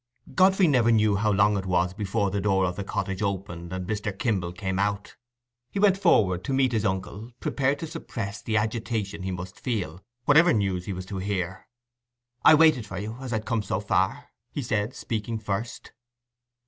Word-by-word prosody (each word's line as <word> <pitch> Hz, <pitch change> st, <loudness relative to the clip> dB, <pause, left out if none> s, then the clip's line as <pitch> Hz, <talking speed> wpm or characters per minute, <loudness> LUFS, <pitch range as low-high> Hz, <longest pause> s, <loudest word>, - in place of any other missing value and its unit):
Godfrey 190 Hz, 0 st, +5 dB
never 125 Hz, -6 st, +4 dB
knew 110 Hz, -2 st, +3 dB
how 105 Hz, +2 st, +1 dB
long 100 Hz, +1 st, +4 dB
it 95 Hz, -, -6 dB
was 90 Hz, 0 st, +1 dB
before 100 Hz, 0 st, -1 dB
the 100 Hz, +1 st, -1 dB
door 95 Hz, -2 st, +2 dB
of 90 Hz, 0 st, -2 dB
the 100 Hz, -, -4 dB
cottage 95 Hz, 0 st, -3 dB
opened 90 Hz, -4 st, -3 dB
and 95 Hz, 0 st, -4 dB
Mr. 105 Hz, -2 st, -3 dB
Kimble 95 Hz, -6 st, -1 dB
came 95 Hz, +1 st, -3 dB
out. 100 Hz, 0 st, -1 dB, 0.5 s
He -, -, -6 dB
went 200 Hz, -1 st, +5 dB
forward 95 Hz, -, +3 dB
to 135 Hz, -, -1 dB
meet 130 Hz, -1 st, +3 dB
his 110 Hz, -2 st, 0 dB
uncle, 100 Hz, +4 st, -3 dB
prepared 140 Hz, +1 st, 0 dB
to 165 Hz, -, -5 dB
suppress 115 Hz, -10 st, -6 dB
the 110 Hz, -1 st, 0 dB
agitation 110 Hz, -2 st, -2 dB
he 95 Hz, -, -3 dB
must 90 Hz, +1 st, -6 dB
feel, 95 Hz, -8 st, -3 dB, 0.2 s
whatever 160 Hz, +4 st, +6 dB
news 95 Hz, -4 st, 0 dB
he -, -, -4 dB
was 90 Hz, 0 st, -6 dB
to 95 Hz, 0 st, -5 dB
hear. 95 Hz, -2 st, -3 dB, 0.8 s
"I 155 Hz, -, +9 dB
waited 150 Hz, -8 st, +4 dB
for 95 Hz, -, -6 dB
you, 110 Hz, +4 st, -5 dB
as 130 Hz, -2 st, -6 dB
I'd 110 Hz, -1 st, -2 dB
come 115 Hz, -2 st, 0 dB
so -, -, -2 dB
far," -, -, 0 dB, 0.2 s
he 145 Hz, -, -4 dB
said, 110 Hz, +1 st, -1 dB
speaking 115 Hz, 0 st, -3 dB
first. 110 Hz, +2 st, -4 dB
105 Hz, 190 wpm, -26 LUFS, 95-115 Hz, 0.8 s, I